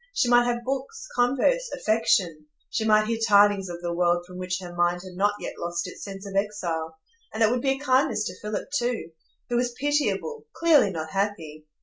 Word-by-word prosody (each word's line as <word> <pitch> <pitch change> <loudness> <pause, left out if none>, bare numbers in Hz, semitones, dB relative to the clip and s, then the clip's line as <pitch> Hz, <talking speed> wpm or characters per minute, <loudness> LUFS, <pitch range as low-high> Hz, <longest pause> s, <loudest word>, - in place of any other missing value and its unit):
She 245 - +2
might 240 0 +5
have 240 0 -1
books, 275 - -4
converse, 275 - +2
affection; 185 -8 +1 0.2
she 220 - -1
might 215 -1 +4
hear 225 +1 -2
tidings 205 -3 +4
of 175 0 -7
the 170 0 -2
world 175 0 +1
from 180 0 -10
which 185 0 -2
her 175 -2 -8
mind 175 +1 +1
had 185 -1 -10
not 205 +3 +1
yet - - -7
lost 170 +1 -3
its 180 - -9
sense 195 0 -8
of 195 -1 -7
exile; 170 -6 -2 0.3
and 225 - 0
it 220 - +4
would 245 0 0
be 270 0 +2
a - - -6
kindness 260 -5 +2
to 180 - -6
Philip 210 +5 -4
too, 245 -9 -1 0.4
who 240 - +1
was 245 0 0
pitiable,—clearly 305 - +1
not 160 -3 -5
happy. 160 -6 -3
205 Hz, 200 wpm, -25 LUFS, 180-245 Hz, 0.4 s, might